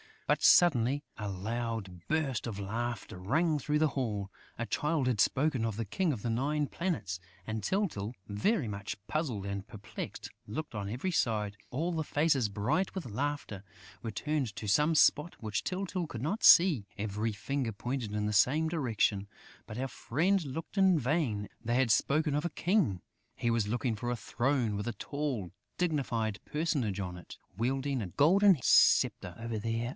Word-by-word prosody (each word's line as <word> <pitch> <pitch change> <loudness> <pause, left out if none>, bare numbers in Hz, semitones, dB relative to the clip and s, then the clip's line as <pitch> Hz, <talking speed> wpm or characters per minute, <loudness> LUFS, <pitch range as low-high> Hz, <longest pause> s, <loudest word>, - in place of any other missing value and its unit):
But, - - +2
suddenly, 145 -4 +5
a 105 -2 -4
loud 105 -2 -4
burst 145 -7 0
of 110 -4 -4
laughter 110 -1 -4
rang 155 - +1
through 150 +1 0
the 155 -1 +3
hall. 105 -8 -3 0.3
A 120 - -2
Child 150 +1 0
had 120 -5 +1
spoken 130 0 +2
of 110 -3 -2
the 115 - -2
King 165 - 0
of 115 - -6
the 120 - -2
Nine 145 +6 0
Planets; 135 - -2 0.3
and 110 0 -3
Tyltyl, 125 - -1
very 120 - +1
much 100 -1 -4
puzzled 130 - -2
and 100 0 -4
perplexed, 110 -4 -7 0.2
looked 150 +8 -5
on 100 -2 -4
every 130 - -2
side. 105 - 0
All 160 +8 -1
the 160 -2 -2
faces, 145 -6 +2
bright 105 - 0
with 190 - -4
laughter, 130 -3 -3 0.4
were 115 - -4
turned 130 0 -2
to 115 -2 -6
some 150 +10 +3
spot 150 +2 +4
which 110 -2 -2
Tyltyl 185 -2 -2
could 115 -6 -6
not 190 - -1
see; 160 - +7
every 105 +2 -2
finger 125 +2 -2
pointed 115 +1 -3
in 105 0 -1
the 105 - -1
same 145 +10 +3
direction; 110 - 0 0.4
but 110 - -7
our 135 +1 -2
friend 170 +11 0
looked 160 +8 -6
in 190 -3 +5
vain. 125 -7 0
They 120 +1 -1
had 130 -2 +3
spoken 150 +6 +2
of 150 - 0
a - - 0
king! 165 - +1 0.3
He 120 - 0
was 115 -3 +1
looking 120 0 -1
for 120 +3 -3
a 120 - 0
throne 120 -1 0
with 105 - -4
a 120 - -1
tall, 135 - -3 0.3
dignified 125 - -1
personage 140 - -1
on 90 -2 -5
it, 90 - -11 0.2
wielding 135 +3 0
a 100 - -3
golden 180 - +5
sceptre. 90 -2 +4
"Over 115 -1 -4
there 115 +2 -2
120 Hz, 175 wpm, -31 LUFS, 105-150 Hz, 0.4 s, see